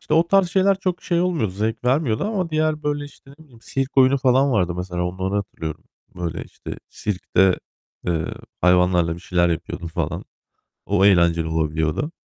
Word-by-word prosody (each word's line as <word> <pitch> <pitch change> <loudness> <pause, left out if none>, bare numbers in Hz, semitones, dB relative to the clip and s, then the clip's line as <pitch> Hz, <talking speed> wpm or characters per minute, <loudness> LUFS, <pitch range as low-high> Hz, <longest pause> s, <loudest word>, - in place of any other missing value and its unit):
işte - - -1
o 165 +1 +4
tarz 195 -2 +4
şeyler 190 +1 +3
çok 180 -2 -2
şey 170 -1 +1
olmuyordu, 170 - 0
zevk 110 +4 -2
vermiyordu 130 - +1
ama 195 -5 -1
diğer 155 -1 0
böyle 145 0 -1
işte, 145 -1 -15
ne 160 - -15
bileyim, 120 -6 -19
sirk 135 +2 -3
oyunu 130 +1 +5
falan 135 +1 +3
vardı 90 -5 +1
mesela 90 -1 -3
onları 95 +2 -2
hatırlıyorum. 80 -6 -4 0.3
Böyle 85 -2 -3
işte - - -9
sirkte, 95 -2 +1 0.5
eee, 80 -2 0 0.4
hayvanlarla 90 -1 +3
bir 85 - -11
şeyler 85 -1 +1
yapıyordun 85 +1 -3
falan. 80 - -3 0.6
O 100 -1 +2
eğlenceli 85 -4 +4
olabiliyordu. 80 - -1
105 Hz, 165 wpm, -22 LUFS, 90-150 Hz, 0.6 s, oyunu